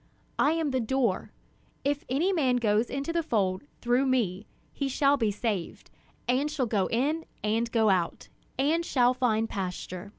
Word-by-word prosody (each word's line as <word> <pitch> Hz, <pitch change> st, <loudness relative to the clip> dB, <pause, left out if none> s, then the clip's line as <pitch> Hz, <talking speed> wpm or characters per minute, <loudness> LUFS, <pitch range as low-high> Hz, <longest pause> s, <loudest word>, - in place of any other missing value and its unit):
I 295 Hz, -, +4 dB
am 325 Hz, -3 st, 0 dB
the 260 Hz, -, +1 dB
door; 235 Hz, -4 st, 0 dB, 0.5 s
if 290 Hz, +4 st, -1 dB
any 325 Hz, +10 st, +1 dB
man 265 Hz, -8 st, +2 dB
goes 225 Hz, -1 st, +2 dB
into 280 Hz, +4 st, -3 dB
the 340 Hz, -, +2 dB
fold 205 Hz, -, 0 dB, 0.2 s
through 245 Hz, +3 st, +2 dB
me, 215 Hz, -6 st, 0 dB, 0.3 s
he 275 Hz, -1 st, -2 dB
shall 280 Hz, +2 st, +3 dB
be 230 Hz, -6 st, +1 dB
saved, 205 Hz, -3 st, -3 dB, 0.4 s
and 260 Hz, +4 st, +2 dB
shall 295 Hz, -4 st, -1 dB
go 205 Hz, -5 st, +1 dB
in 295 Hz, +8 st, 0 dB, 0.2 s
and 225 Hz, +2 st, 0 dB
go 220 Hz, -3 st, +4 dB
out, 180 Hz, -3 st, -1 dB, 0.3 s
and 305 Hz, +6 st, +2 dB
shall 250 Hz, -6 st, +3 dB
find 225 Hz, -3 st, +1 dB
pasture. 185 Hz, -1 st, -5 dB
245 Hz, 165 wpm, -28 LUFS, 215-280 Hz, 0.5 s, I